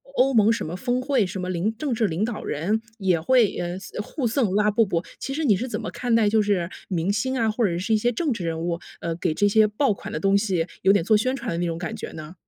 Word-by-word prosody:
欧 270 +1 +3
盟 220 0 +5
什 230 - -1
么 165 +3 -5
峰 245 +5 -1
会， 260 -4 +1
什 190 0 -4
么 180 0 -3
领 195 +6 -1
政 280 -3 -2
治 220 -2 +1
领 175 +6 -1
导 235 -2 -5
人 200 +9 -1 0.2
也 185 -5 +1
会， 250 +4 +5
呃， 175 +1 -3
送 205 - -6
互 270 +1 -4
送 225 -5 +1
拉 210 0 +3
布 225 +2 +3
布。 170 -1 -1 0.2
其 270 - -4
实 320 - -1
你 210 -6 +5
是 250 +7 -3
怎 215 -2 -3
么 220 - -5
看 245 -2 0
待 220 -2 +4
就 215 +1 +3
是 195 -5 +1 0.2
明 185 +1 0
星 260 +6 -1
啊， 225 -2 +2
或 230 +2 -1
者 170 -4 +1
是 205 +5 -1
一 - - +5
些 240 +3 +1
政 280 +2 0
治 185 - -5
人 165 -1 -2
物， 170 0 -2 0.2
呃， 165 -1 -2
给 155 -2 -1
这 205 - +3
些 215 +1 +5
爆 210 +2 +1
款 - - -9
的 - - -3
东 195 0 +2
西 190 -5 +1 0.2
有 190 - +5
点 190 -4 +2
做 215 - +4
宣 255 +5 +1
传 - - -5
的 165 - -2
那 175 - 0
种 165 0 -3
感 170 -2 -4
觉 - - -7
呢？ 155 +2 -8
210 Hz, 315 characters per minute, -24 LUFS, 180-230 Hz, 0.2 s, 盟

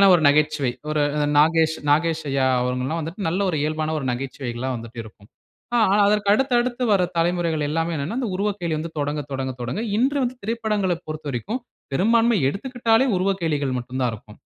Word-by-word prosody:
இயல்பான 195 - +7
ஒரு 165 - +3
நகைச்சுவை 150 -3 +2 0.2
ஒரு 155 -1 +1 0.4
நாகேஷ் 160 +1 +4
நாகேஷ் 160 +2 +2
ஐயா 135 -1 +2
அவங்க 125 0 -1
எல்லாம் 165 +4 -2
வந்துட்டு 165 +5 -4
நல்ல 180 +4 -1
ஒரு 160 - -2
இயல்பான 155 +1 -1
ஒரு 135 - -5
நகைச்சுவைகளா 130 -1 -4
வந்துட்டு 115 0 -8
இருக்கும். 105 -1 -16 0.5
ஆ - - +4 0.3
அதற்கு 205 -1 +1
அடுத்து 265 +1 +1
அடுத்து 250 +1 -2
வர 195 - +4
தலைமுறைகள் 165 -2 +1
எல்லாமே 165 +2 -1
என்னன்னா, 150 - -3
இந்த 240 - -2
உருவக்கேலி 195 -5 -1
வந்து 165 +2 -5
தொடங்க 145 +1 -1
தொடங்க 130 0 -2
தொடங்க 120 - -3 0.2
இன்று 275 +4 +2
வந்து 245 +1 -2
திரைப்படங்களைப் 210 -5 -1
பொறுத்தவரைக்கும் 155 - -4 0.3
பெரும்பான்மை 230 - +3
எடுத்துக்கிட்டாலே 235 - +1
உருவக்கேலிகள் 165 -8 0
மட்டும் 125 +2 -5
தான் 125 -2 +2
இருக்கும். 105 -1 -11
160 Hz, 170 wpm, -23 LUFS, 140-200 Hz, 0.5 s, இயல்பான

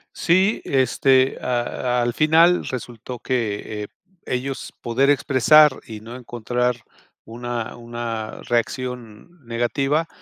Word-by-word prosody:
Sí, 190 +5 +2
este, 130 0 +3
a 125 0 -1
al 120 0 0
final 165 +4 +4
resultó 120 -1 -6
que, 110 -3 -2
eh, - - -7 0.4
ellos 130 +2 -4
poder 130 +4 +1
expresar 145 +2 +5
y 110 -2 -9
no 115 +2 -9
encontrar 120 0 -2 0.5
una 120 0 -5
una 115 -2 -5
reacción 125 +4 -4
negativa, 135 +7 0
125 Hz, 105 wpm, -22 LUFS, 115-135 Hz, 0.5 s, expresar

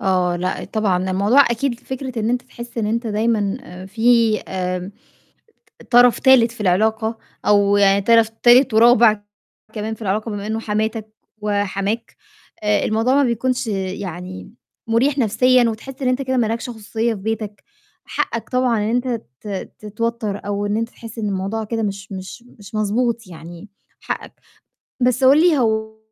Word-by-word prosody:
آه، 180 -2 +1
لأ، 185 +2 -3
طبعًا 190 -4 -1
الموضوع 205 +9 +4
أكيد 235 +1 -1
فكرة 260 -1 -6
إن 220 - 0
أنت 250 +1 0
تحس 235 -1 -10
إن 215 - 0
أنت 230 +2 -1
دايمًا 215 -1 0
آآ، 185 -5 -10
في 230 +1 +3
آمم، 185 +1 -4 0.9
ط - - -14
طرَف 245 0 +6
تالت 255 -3 +5
في 230 - -10
العلاقة 220 +4 +1 0.3
أو 205 -1 +4
يعني 200 0 +4
طرَف 230 +1 +4
تالت 240 +2 +4
ورابع 225 -2 +5 0.5
كمان 215 0 -4
في 220 - -12
العلاقة 215 +2 -2
بما 205 0 -5
إنه 220 +1 -2
حماتك 220 0 -3 0.3
وحماك 205 +2 -2 0.5
آآ، 210 -1 +2
الموضوع 225 +5 +1
ما 285 - +4
بيكونش 245 0 -1
يعني 185 -2 -5 0.4
م 225 - -2
مُريح 270 +5 +2
نَفْسيًا، 250 +2 +3
وتحس 260 +5 -8
إن 255 - 0
أنت 255 +1 +1
كده 260 -1 -1
ما 230 - +2
لَكش 230 +2 -3
خصوصية 225 0 -2
في 210 - -7
بيتك، 215 -1 -4 0.4
حقّك 230 - -3
طبعًا 250 -2 +1
إن 210 +1 -1
أنت 245 +2 0 0.3
ت - - -11 0.3
تتوتّر 215 0 -3
أو 205 0 -2
أنت 220 +3 -1
تحس 230 -1 -12
إن 215 - -2
الموضوع 195 +3 -2
كده 225 +1 -3
مش 200 0 -5
مش 190 +5 -8 0.2
مش 205 +1 -11
مضبوط 225 +1 0
يعني 170 +3 -11 0.3
حقّك. - - -5 0.7
بس 250 +1 +2
قُل 275 +4 +6
لي 335 -4 +4
هو 220 -2 -1
220 Hz, 165 wpm, -20 LUFS, 205-235 Hz, 0.9 s, طرَف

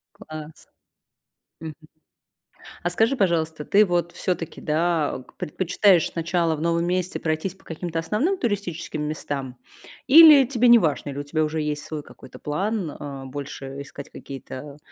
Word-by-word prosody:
Класс. 155 -6 -10 0.9
Мгм. 160 -1 -7 1.1
А 175 - +1
скажи, 225 +9 +1
пожалуйста, 160 -6 0
ты 210 +2 +5
вот 175 -2 -1
всё-таки, 170 -3 -3
да, 160 0 0
ог 130 - -14
предпочитаешь 180 +2 +2
сначала 170 -1 0
в 150 - -7
новом 170 +1 +1
месте 180 +1 -1
пройтись 160 +4 -2
по - - -25
каким-то 165 0 -4
основным 215 - 0
туристическим 195 - -3
местам? 140 -4 -4 0.5
Или 300 -1 +9
тебе 250 -1 +2
неважно, 160 -11 +4
или 140 - -6
у - - -3
тебя 155 +2 -1
уже 155 +1 -2
есть 150 -1 -3
свой 155 -2 -6
какой-то - - -14
план, 185 +3 -2
а, 140 -2 -7
больше 135 0 -7
искать 140 0 -10
какие-то, 140 +1 -9
165 Hz, 145 wpm, -24 LUFS, 150-185 Hz, 1.1 s, Или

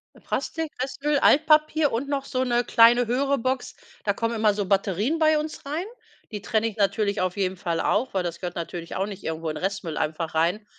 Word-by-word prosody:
Äh, - - -18
Plastik, 320 -2 -3
Restmüll, 285 +2 -1
Altpapier 305 0 +4
und 250 +5 -2
noch 275 -1 -1
so 255 0 -1
'ne 240 -1 +1
kleine, 235 +2 +5
höhere 275 +3 +1
Box. 255 +2 -2 0.3
Da 205 - +1
kommen 230 +2 -2
immer 215 -2 +3
so 205 -1 -2
Batterien 200 - 0
bei 310 -1 +4
uns 305 -1 -5
rein. 310 +6 -3 0.5
Die 210 -2 -5
trenne 220 +2 0
ich 220 - -7
natürlich 200 0 +1
auf 185 +2 -1
jeden 190 -1 -1
Fall 170 -2 -2
auch, 230 +4 0
weil 185 -2 0
das 170 -1 -4
gehört 175 -1 -5
natürlich 170 0 -6
auch 195 - 0
nicht 200 -2 -8
irgendwo 160 0 -3
in 155 - -4
Restmüll 190 -4 -3
einfach 160 +1 -2
rein. 175 +7 +1
215 Hz, 210 wpm, -25 LUFS, 185-275 Hz, 0.5 s, kleine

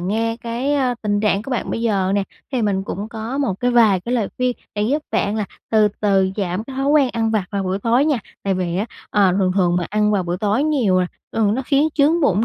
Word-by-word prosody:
nghe 225 +5 -1
cái 245 +5 -1
á 255 -3 +1
tình 205 -1 0
trạng 210 -1 +1
của 270 - -8
bạn 250 - -2
bây 230 - -2
giờ 195 -4 +1
nè, 200 - +2 0.3
thì 245 -3 0
mình 195 -2 0
cũng 205 +3 -5
có 230 +4 -5
một 235 -10 -1
cái 245 0 +2
vài 220 -6 +4
cái 240 +7 -3
lời 220 -5 0
khuyên 250 -1 0 0.2
để 210 - -1
giúp 285 +8 0
bạn 205 +2 0
là 215 - -1 0.3
từ 215 -1 +4
từ 195 -2 +2
giảm 190 +1 -2
cái 265 0 -9
thói 270 +1 -1
quen 285 -3 +4
ăn 225 -1 0
vặt 215 -4 0
vào 200 -2 -2
buổi 190 +1 -1
tối 240 +6 +2
nha. 295 -6 +1 0.2
Tại 195 -1 0
vì 180 -2 -2
á, 205 +5 -1 0.2
ờ, 200 -3 +3
thường 185 -2 +2
thường 175 -3 +2
mà 175 - -1
ăn 210 0 +2
vào 195 -3 +1
buổi 175 +1 -2
tối 210 +6 +1
nhiều 235 -12 +2
nè 180 - +1 0.3
thường 215 -1 +2
nó 265 - -2
khiến 285 +2 +3
chướng 310 +4 +3
bụng 215 - +2
215 Hz, 260 wpm, -20 LUFS, 195-250 Hz, 0.3 s, vài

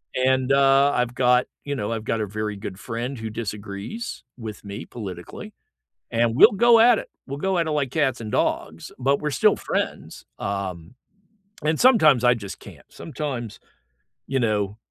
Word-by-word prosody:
And, 130 0 +2
uh, 135 +1 +5
I've 125 0 0
got 125 0 +3 0.2
you 145 0 -3
know, 115 -5 -3
I've 115 -1 -3
got 115 -1 -1
a - - 0
very 105 +1 -4
good 100 -1 -7
friend 120 +4 -4
who 110 0 -4
disagrees 105 - -6
with 110 -4 -8
me 100 +1 -7
politically, 95 -7 -8 0.6
and 115 0 +1
we'll - - +8
go 230 +2 +5
at 235 -1 +6
it, - - -7 0.2
we'll 140 +1 -5
go 190 +2 0
at 165 - +1
it - - -1
like 145 -4 0
cats 135 -6 +1
and 110 -2 -6
dogs, 80 0 -1
but 135 +2 +1
we're 150 0 -2
still - - +3
friends, - - -4
um, 100 0 -4 0.7
and 155 0 +1
sometimes 155 - +6
I 125 - +6
just 100 -5 -8
can't, - - -13
sometimes, 130 -8 -5 0.7
you 135 0 0
know, 105 -3 0
125 Hz, 175 wpm, -23 LUFS, 105-140 Hz, 0.7 s, we'll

